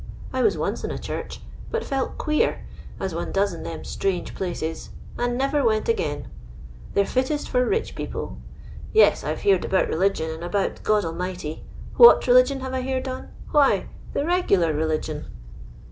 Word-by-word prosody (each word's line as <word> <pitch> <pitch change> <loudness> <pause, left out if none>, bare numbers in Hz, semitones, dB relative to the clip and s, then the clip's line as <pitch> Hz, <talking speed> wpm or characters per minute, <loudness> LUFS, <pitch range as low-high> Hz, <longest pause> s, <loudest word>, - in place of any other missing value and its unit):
I - - 0
was 435 - +3
once - - -2
in - - -2
a - - -4
church, - - -6 0.3
but 465 0 -2
felt 270 -1 -2
queer, 305 -1 0 0.3
as 190 - -3
one 170 - -3
does 195 -1 +1
in 170 - -7
them 165 - -6
strange 190 -3 -2
places, 165 -3 -4 0.3
and 245 0 -1
never 275 +2 +1
went 215 -2 +2
again. 145 -10 -1 0.7
They're 200 - +4
fittest 260 +6 -1
for 250 -1 +2
rich 430 - -1
people. - - -5 0.5
Yes, 440 - +5
I've - - -3
heered 400 -2 +3
about 190 - +1
religion 170 -2 0
and 160 +1 -7
about 195 +3 -1
God 210 -3 +2
Almighty. 165 -1 -5 0.3
What 475 0 +9
religion - - +5
have 260 0 -5
I 260 - -1
heered 260 +1 -2
on? 255 0 -6 0.2
Why, 290 -2 +3 0.3
the - - +1
regiUar 200 - +2
religion. 155 0 -2
215 Hz, 165 wpm, -24 LUFS, 175-275 Hz, 0.7 s, What